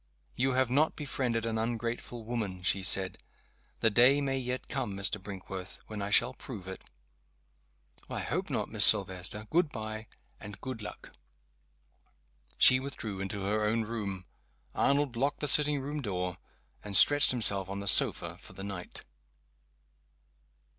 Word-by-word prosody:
"You 130 +1 0
have 130 -1 +1
not 150 +4 +2
befriended 125 -6 -2
an 110 -1 -2
ungrateful 115 +1 -4
woman," 105 -6 -4
she 95 +1 +1
said. 95 0 +1 0.6
"The 115 - +3
day 125 +6 +5
may 135 -1 -1
yet 125 0 -5
come, 100 - -4
Mr. 100 +1 -1
Brinkworth, 95 -1 -8
when 105 -2 -7
I 100 - -3
shall 120 +4 +3
prove 110 -7 -10
it." 95 - -8 1.3
"I - - -4
hope - - -3
not, - - -2
Miss - - +4
Silvester. 95 +3 +5
Good 170 -1 +2
by, 110 -1 -7 0.3
and 100 -1 -10
good 130 -4 -6
luck!" 105 - -10 1.5
She 130 - +6
withdrew 115 -7 -6
into 95 +1 -5
her 105 +2 -1
own 110 +2 0
room. 100 -5 -5 0.5
Arnold 140 -2 +1
locked 140 +4 -1
the 150 - -2
sitting 150 +1 +4
room 145 +2 -5
door, 90 -5 -4 0.4
and 100 -2 +1
stretched 145 0 +6
himself 100 -6 +2
on 100 0 -5
the 100 - -7
sofa 95 - +4
for - - -11
the 95 - -9
night. 100 -3 -8
110 Hz, 150 wpm, -30 LUFS, 100-130 Hz, 1.5 s, She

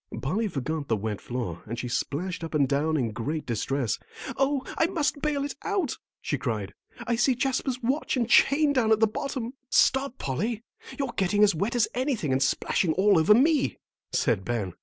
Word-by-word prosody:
Polly 205 +11 -1
forgot 150 -2 -3
the 110 - +1
wet 105 0 -4
floor 115 -10 -4
and 115 +2 -4
she 125 - -3
splashed 165 +8 -2
up 165 -1 -4
and 140 -3 +3
down 150 +3 +1
in 120 -5 0
great 140 +8 -3
distress. 120 +1 -1 0.4
"Oh, 275 0 +1
I 325 - +3
must 305 -5 -1
bale 290 -2 0
it 285 - -4
out," 390 - -1 0.2
she 145 - -1
cried. 105 -6 -3 0.3
"I 235 - +1
see 240 +2 +3
Jasper's 255 0 -1
watch 265 +3 0
and 235 -3 +1
chain 285 +4 +5
down 235 -5 +2
at 220 - +5
the 220 - +6
bottom." 240 +2 -4 0.2
"Stop, 265 -1 +3
Polly, 215 - -2 0.3
you're 275 -4 -2
getting 205 +2 +3
as 205 -2 +5
wet 200 +10 -1
as 235 -3 +3
anything 250 - -1
and 130 +1 +1
splashing 160 +5 +1
all 195 0 +4
over 185 +7 +6
me," 285 +3 +3 0.3
said 115 -7 +1
Ben. 105 -5 -2
205 Hz, 190 wpm, -27 LUFS, -, 0.4 s, the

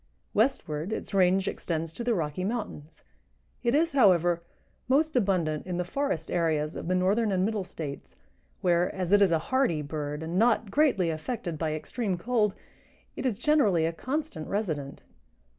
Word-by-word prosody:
Westward 205 - 0
its 220 - -4
range 190 0 +3
extends 165 -1 -3
to 240 - -5
the 235 -1 +1
Rocky 160 0 -2
Mountains. 200 -8 -5 0.6
It 240 +2 +2
is, 330 +2 +3
however, 175 - +4 0.5
most 300 +4 +2
abundant 180 -9 +1
in 180 -1 -2
the 180 - -1
forest 180 - -2
areas 160 -3 0
of - - -6
the 185 - +1
Northern 200 +4 +2
and 185 -1 +2
Middle 215 -2 -1
States, 155 -6 -7 0.5
where, 175 0 +2
as 185 -1 -2
it 205 0 +6
is 195 -3 +5
a 165 - +4 0.2
hardy 245 - +2
bird 150 +1 -4
and 170 +3 -1
not 225 -2 +2
greatly 205 - +3
affected 165 0 -4
by 155 -2 -1
extreme 195 +4 -3
cold, 215 0 +1 0.6
it - - -1
is 225 -6 -1
generally 235 - +3
a 165 - -1
constant 260 - -4
resident. 155 -10 -3
185 Hz, 165 wpm, -28 LUFS, 165-230 Hz, 0.6 s, it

